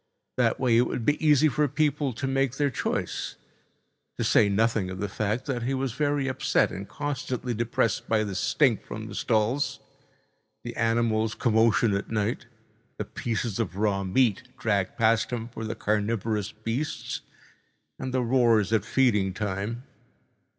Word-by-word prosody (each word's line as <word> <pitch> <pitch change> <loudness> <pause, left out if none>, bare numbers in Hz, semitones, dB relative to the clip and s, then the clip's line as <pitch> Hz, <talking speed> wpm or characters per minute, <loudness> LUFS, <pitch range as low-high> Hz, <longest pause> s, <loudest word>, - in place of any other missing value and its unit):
That - - +2
way 120 -3 +3
it 120 - +4
would 115 - -3
be 150 +2 +1
easy 150 0 +5
for 150 +1 +1
people 145 -1 0
to 125 +3 -4
make 135 0 0
their 145 -2 +1
choice, - - -2 0.8
to - - -1
say 105 - +4
nothing 105 -1 +1
of 95 0 -6
the 105 - -1
fact 105 +4 -2
that 130 -3 -2
he 130 +3 -1
was 135 -1 -1
very 145 0 0
upset 130 - +1
and 95 +1 -7
constantly 130 -4 -3
depressed 115 0 0
by 110 -1 +3
the 100 -2 -4
stink 110 +5 +2
from - - -7
the - - -8
stalls, 115 +6 0 0.8
the 120 - -6
animals' 115 -1 +1
commotion 110 -1 +3
at 100 - -3
night, 110 +1 -1 0.5
the - - -3
pieces 115 -2 -3
of 95 -6 -2
raw 100 -1 +1
meat 105 +3 +2 0.2
dragged 100 -4 0
past 115 0 +3
him 120 -1 -4
for 115 -1 -7
the 110 - -3
carnivorous 105 0 -1
beasts, 115 +8 -4 0.8
and 130 - -4
the 130 -1 +1
roars 115 -4 +3
at 110 -4 +3
feeding 105 -6 +2
time. 105 +4 -3
115 Hz, 160 wpm, -27 LUFS, 105-130 Hz, 0.8 s, easy